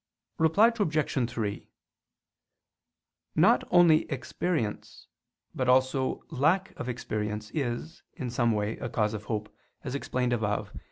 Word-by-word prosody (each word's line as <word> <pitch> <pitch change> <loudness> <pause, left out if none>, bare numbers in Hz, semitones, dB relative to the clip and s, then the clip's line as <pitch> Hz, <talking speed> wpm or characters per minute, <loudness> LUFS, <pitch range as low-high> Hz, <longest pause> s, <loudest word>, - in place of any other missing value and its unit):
Reply 180 +9 +5
Obj. 150 - 0
3: 105 -4 -4 1.7
Not - - +5
only 170 -3 +5
experience, 135 -3 -3 0.5
but 130 -1 -1
also 130 +1 +2
lack 165 +7 +2
of 125 - -4
experience, 105 -3 -3
is, 140 +3 -3
in 130 -7 -5
some 120 -1 +2
way, 105 0 -1
a 120 - -4
cause 110 -1 0
of 110 -1 -6
hope, 105 -1 -4 0.3
as 130 - -4
explained 125 -3 -1
above 105 -3 -1
(A. - - -8
125 Hz, 125 wpm, -28 LUFS, 110-155 Hz, 1.7 s, Reply